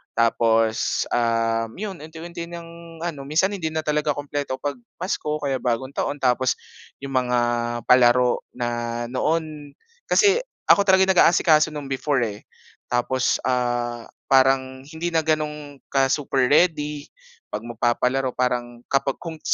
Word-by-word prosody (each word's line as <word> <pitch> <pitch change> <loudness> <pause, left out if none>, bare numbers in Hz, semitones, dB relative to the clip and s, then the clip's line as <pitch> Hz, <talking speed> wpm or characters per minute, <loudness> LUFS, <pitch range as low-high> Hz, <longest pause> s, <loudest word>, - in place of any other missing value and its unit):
Tapos, 115 -1 +2
um, 115 -1 +1
'yon, 195 -4 -6
unti-unti 170 +2 -8
ng 170 -1 -10
ano, 145 -5 -5
minsan 165 +7 +2
hindi 185 -6 -3
na 160 0 -3
talaga 150 -1 0
kumpleto 145 -2 -3
'pag 140 -1 -4 0.2
Pasko 160 -4 -2
o - - -6
kaya 135 -2 -1
Bagong 125 +2 -2
Taon 145 - -2
tapos 125 0 +2 0.5
'yong 140 - -5
mga 125 -1 +1 0.4
palaro 125 0 +4 0.2
na 120 0 -3
noon 150 0 -2 0.3
kasi 410 +2 +4 0.3
ako 200 0 +4
talaga 190 0 +6
yung 190 - +3
nag-aasikaso 160 -3 +5
no'n 145 -2 -6
before 135 0 0
eh. 105 -2 -5 0.4
Tapos, 125 +1 0
ah, 120 -2 -1 0.2
parang 130 0 +3
hindi 160 +3 -4
na 160 -2 0
gano'n 150 -2 -2
ka 135 -1 +3
super 135 -3 +1
ready 150 -1 +2 0.5
'pag - - -5
magpapalaro, 125 +3 0
parang 120 -1 -2
kapag 135 0 +1
kung 165 -2 -8
140 Hz, 140 wpm, -23 LUFS, 125-160 Hz, 0.5 s, talaga